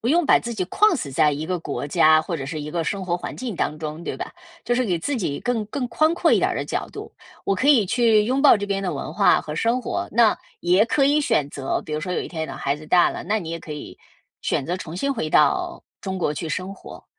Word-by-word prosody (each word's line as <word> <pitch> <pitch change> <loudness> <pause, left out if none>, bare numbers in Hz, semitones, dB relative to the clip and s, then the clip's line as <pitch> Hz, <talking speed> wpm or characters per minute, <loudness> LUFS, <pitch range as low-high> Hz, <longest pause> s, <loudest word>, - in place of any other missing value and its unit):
不 235 - -2
用 335 +4 +3
把 - - +6
自 235 - -5
己 190 -4 -1
框 420 - +3
死 150 - -5
在 150 +3 +3
一 150 +2 -4
个 180 +1 -1
国 150 -3 -4
家 155 +2 +5
或 165 +1 -4
者 135 - -5
是 155 +2 -4
一 150 - -6
个 165 0 -2
生 195 +2 -2
活 175 -1 0
环 175 - -7
境 250 -5 -4
当 155 - -1
中， 155 +1 -6
对 - - -4
吧？ - - -6 0.3
就 240 +1 +1
是 255 0 +1
给 180 -5 0
自 285 - -2
己 160 - -2
更 245 -3 -1
更 250 +4 -3
宽 310 +5 +2
阔 - - +2
一 - - +5
点 - - +1
儿 - - -3
的 - - -2
角 - - -3
度。 - - -9 0.3
我 195 - +1
可 255 +9 0
以 240 -10 +5
去 225 -1 +3
拥 260 +4 0
抱 290 - +7
这 205 0 -4
边 195 -1 -1
的 180 -3 -1
文 140 - -5
化 - - +4
和 150 - -6
生 230 +9 +1
活， - - -3
那 225 -1 +4 0.2
也 180 +5 +4
可 275 +4 +2
以 290 +2 +3
选 225 - +1
择， 135 -2 -3
比 155 - -7
如 150 - -1
说 180 +3 -4
有 - - -1
一 - - -6
天 160 -2 -4
等 - - -7
孩 140 +1 -1
子 155 +1 -12
大 175 +1 +4
了， - - -6
那 215 +1 0
你 165 -5 -6
也 165 - -4
可 155 - -8
以 150 - -9 0.4
选 - - 0
择 175 +3 -1
重 170 -2 -7
新 275 +9 0
回 160 -10 -2
到 150 -2 +2 0.2
中 190 -1 -4
国 150 -4 0
去 160 +2 -4
生 185 +5 -4
活。 - - -12
185 Hz, 305 characters per minute, -23 LUFS, 155-235 Hz, 0.4 s, 抱